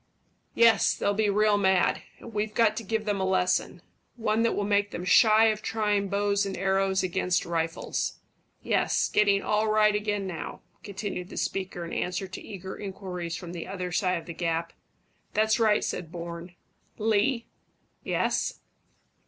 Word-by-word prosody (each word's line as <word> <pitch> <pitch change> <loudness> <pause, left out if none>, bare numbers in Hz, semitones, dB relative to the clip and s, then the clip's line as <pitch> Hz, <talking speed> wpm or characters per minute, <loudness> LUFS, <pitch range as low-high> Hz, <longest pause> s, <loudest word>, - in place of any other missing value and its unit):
"Yes. 230 -1 +5
They'll 200 - 0
be 210 0 +1
real 210 0 +3
mad; 190 -2 +2 0.2
and 230 - -11
we've 210 0 -2
got 220 -2 +4
to 230 - -3
give 220 +1 -2
them 205 -2 -1
a - - +1
lesson 185 -1 0 0.3
one 220 -2 0
that 230 - +2
will 205 - -1
make 205 0 +1
them 180 - -6
shy 215 +4 +6
of 215 -1 -2
trying 210 -2 0
bows 200 0 +1
and 195 -1 -4
arrows 190 0 +1
against 180 0 0
rifles. 165 -1 -2 0.5
Yes, - - +1
getting 200 -1 +3
all 215 +1 +1
right 215 0 +4
again 210 -1 -1
now," 180 -4 -6 0.2
continued 195 -2 -5
the - - -9
speaker, 185 -3 -3
in 170 - -7
answer 180 +2 -2
to 190 - -8
eager 190 -2 -8
inquiries 185 -4 -5
from 175 -2 -7
the 170 - -6
other 185 -2 -4
side 185 0 +1
of 165 - -8
the 170 - -7
gap. 165 0 -2 0.6
"That's 220 +2 +3
right," 215 -2 +3
said 165 -3 -4
Bourne. 170 0 -7 0.4
"Lee." 225 +3 +1 0.6
"Yes?" - - -1
200 Hz, 165 wpm, -27 LUFS, 180-215 Hz, 0.6 s, shy